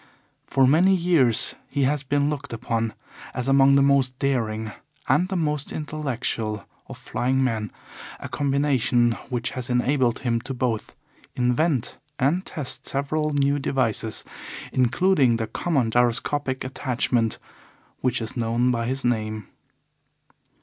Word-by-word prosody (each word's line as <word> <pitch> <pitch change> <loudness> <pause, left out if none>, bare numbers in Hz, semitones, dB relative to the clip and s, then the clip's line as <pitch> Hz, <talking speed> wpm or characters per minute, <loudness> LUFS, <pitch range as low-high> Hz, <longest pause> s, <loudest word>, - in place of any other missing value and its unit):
For 135 - +3
many 175 +8 +5
years 165 -10 +3 0.2
he 140 -1 0
has 145 +2 +1
been 145 +1 +1
looked 140 -3 -4
upon 115 -1 -2 0.4
as 125 0 -2
among 135 0 +5
the 140 - +5
most 135 -2 +2
daring 110 -6 -1 0.4
and 175 +6 +3
the 190 - -2
most 150 -4 -1
intellectual 125 -8 -3 0.2
of - - -9
flying 130 +2 0
men, 110 -5 -1 0.5
a - - -6
combination 135 -4 +2 0.2
which 120 -2 -2
has 130 0 -5
enabled 125 0 +1
him 115 -3 0
to 135 +2 -6
both 120 -4 -2 0.4
invent 125 +2 0 0.2
and 145 +7 +1
test 145 -8 -5
several 150 +3 -1
new 140 0 +2
devices, 115 -5 -1 0.5
including 130 0 +3
the 115 -1 -1
common 130 -1 0
gyroscopic 125 +3 +1
attachment 125 -3 -1 0.6
which 125 -2 0
is 110 - -5
known 120 +1 +1
by 115 -1 -1
his 135 +1 -3
name. 110 -3 -1
130 Hz, 130 wpm, -24 LUFS, 120-140 Hz, 0.6 s, many